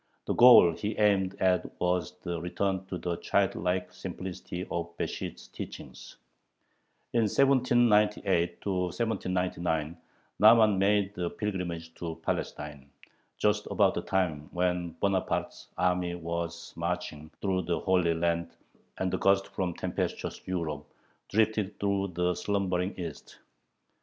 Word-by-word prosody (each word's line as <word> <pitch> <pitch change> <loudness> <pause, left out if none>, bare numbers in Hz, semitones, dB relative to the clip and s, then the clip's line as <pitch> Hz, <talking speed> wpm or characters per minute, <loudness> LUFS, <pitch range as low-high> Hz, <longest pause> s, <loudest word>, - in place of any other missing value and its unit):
The - - 0
goal 120 -9 +8
he 105 +5 -4
aimed 100 -3 +2
at 90 -3 0
was 90 -1 0
the 85 -2 -3
return 95 +2 -2
to 90 - -4
the 85 -1 -3
childlike 95 -2 0
simplicity 90 -1 -6
of 85 0 -4
Besht's - - -5
teachings. - - -9 1.0
In 115 -2 +3
1798 105 -9 +3
1799 90 -4 -1 0.5
Nahman 110 -2 +7
made 100 0 +2
a 85 -1 0
pilgrimage 85 -5 -4
to 85 -2 -4
Palestine, 75 -4 -4 0.5
just - - +1
about - - +3
the - - -2
time 80 -6 -1
when 90 -1 -1
Bonaparte's 100 -2 -1
army 90 -1 +1
was 85 0 -5
marching 85 -3 -4
through 95 -2 0
the 85 0 -1
Holy 90 -3 +2
Land, 85 0 -1 0.4
and 95 -1 -1
a 95 - 0
gust 100 0 +3
from 90 -3 -2
tempestuous - - -3
Europe 80 -5 -2 0.5
drifted 110 -1 +1
through 100 -1 0
the 90 0 0
slumbering 95 -1 -1
East. 85 -5 -7
90 Hz, 120 wpm, -29 LUFS, 85-100 Hz, 1.0 s, goal